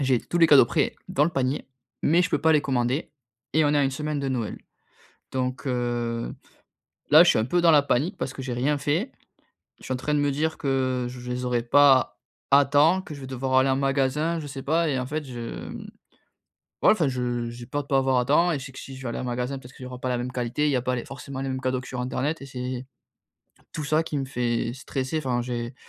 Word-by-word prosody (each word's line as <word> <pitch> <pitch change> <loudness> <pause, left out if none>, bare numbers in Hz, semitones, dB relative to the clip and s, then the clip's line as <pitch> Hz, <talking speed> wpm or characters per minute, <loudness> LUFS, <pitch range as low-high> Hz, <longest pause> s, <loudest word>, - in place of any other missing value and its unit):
j'ai 130 -3 +2
tous 175 - -3
les 165 - +7
cadeaux 140 -5 +8
prêts, - - 0
dans 145 - +2
le 170 - 0
panier. 135 -2 -1 0.3
Mais, 170 +4 +4
je 185 - -1
peux 150 - +1
pas 160 +1 +4
les 150 - +4
commander. 130 +1 -1 0.4
Et, 155 +1 +3
on 145 - +3
est - - +4
à 140 - +3
une 135 - +1
semaine 150 +1 -3
de 135 - -2
Noël. 120 -5 -3 0.7
Donc, 130 0 -2
heu, 120 -2 -2 0.8
là, - - +9
je - - +4
suis - - +4
un 110 - +1
peu 175 +7 +1
dans 170 -1 +6
la 145 -2 +6
panique 145 +7 0
parce 130 - -3
que - - -7
j'ai 130 -2 -4
rien 140 +4 +1
fait. 160 - -1 0.7
Je - - -16
suis - - -3
en - - 0
train 150 +4 -1
de 145 - +2
me 145 - +2
dire 160 +3 -1
que, 130 -2 0
je 125 0 -8
les 125 +1 -3
aurais 120 -1 0
pas 135 +2 +5 0.4
à 140 +1 +7
temps, 150 +7 +4
que 160 - -10
je 140 - -10
vais 130 - -7
devoir 130 0 -3
aller 130 +1 +3
en 130 - +3
magasin, 140 +4 +1
je 150 - -7
sais 135 -1 -7
pas. 160 +4 +1
Et 135 - 0
en 125 - -3
fait, 150 +2 -3
je, 120 -3 -6
mmh, - - -7 1.0
ouais, - - +6
enfin, 170 -9 +2
je, 130 -2 -2
heu, 120 -1 -2
j'ai 120 0 -10
peur 145 +3 -2
de - - -22
pas 135 - +2
avoir 130 -1 +2
à 125 - +2
temps. 170 +6 +3
Et, 155 - 0
je 135 - -8
sais - - -9
que 130 - -10
si 135 - -9
je 135 - -10
vais 125 - -3
aller - - -4
en - - -4
magasin, 125 +2 -3
peut 125 - -13
être 130 - -16
qu'il - - -11
y - - -6
aura 125 -1 -8
pas 130 - -3
la 125 - 0
même 125 +1 -4
qualité. 125 +4 -1
Il - - +2
y - - +1
a 125 - +1
pas 125 0 -1
les 120 - -4
forcément, 135 -1 -7
les 135 - -3
mêmes 130 0 -3
cadeaux 130 0 -1
sur 130 -1 -5
internet 140 +5 -2
et 135 - -7
c'est 125 0 -5 0.9
tout 155 - -4
ça 155 +2 +2
qui 155 - -4
me 135 - -2
fait 120 -3 -1
stresser. 135 +2 -3
Enfin, 125 -5 -1
j'ai 120 0 -4
135 Hz, 270 wpm, -25 LUFS, 125-145 Hz, 1.0 s, là